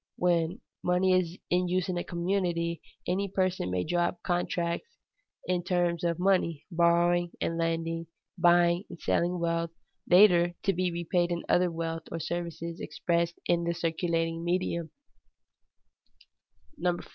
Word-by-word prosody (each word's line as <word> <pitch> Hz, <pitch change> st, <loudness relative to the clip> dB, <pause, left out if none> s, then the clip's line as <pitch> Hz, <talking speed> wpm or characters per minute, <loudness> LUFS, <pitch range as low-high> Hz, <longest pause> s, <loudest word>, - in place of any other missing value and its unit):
When 170 Hz, -2 st, +1 dB, 0.2 s
money 180 Hz, +1 st, +2 dB
is 180 Hz, -1 st, +1 dB
in 180 Hz, +1 st, +2 dB
use 180 Hz, 0 st, 0 dB
in 185 Hz, -, -2 dB
a 175 Hz, -, -1 dB
community, 170 Hz, -2 st, -1 dB, 0.2 s
any 195 Hz, +3 st, 0 dB
person 185 Hz, -, 0 dB
may 90 Hz, 0 st, 0 dB
draw 175 Hz, -, +1 dB
up 175 Hz, -, -4 dB
contracts 175 Hz, -, -2 dB, 0.5 s
in 180 Hz, -1 st, 0 dB
terms 175 Hz, -1 st, 0 dB
of 170 Hz, -1 st, +1 dB
money, 180 Hz, -5 st, +1 dB
borrowing 170 Hz, +1 st, +3 dB
and 165 Hz, -, -1 dB
lending, 165 Hz, 0 st, -1 dB, 0.3 s
buying 175 Hz, +2 st, +4 dB
and 170 Hz, -, -10 dB
selling 175 Hz, +1 st, +1 dB
wealth, 170 Hz, 0 st, 0 dB, 0.4 s
later 175 Hz, -2 st, +6 dB
to 195 Hz, -, +2 dB
be 180 Hz, 0 st, 0 dB
repaid 175 Hz, +1 st, 0 dB
in 170 Hz, 0 st, -2 dB
other 180 Hz, 0 st, +3 dB
wealth 165 Hz, -1 st, -4 dB
or 165 Hz, -, -3 dB
services 170 Hz, 0 st, -4 dB
expressed 170 Hz, 0 st, -1 dB
in 170 Hz, 0 st, +2 dB
the 170 Hz, 0 st, -1 dB
circulating 165 Hz, 0 st, -1 dB
medium. 170 Hz, -2 st, -1 dB
175 Hz, 135 wpm, -29 LUFS, 170-180 Hz, 0.5 s, later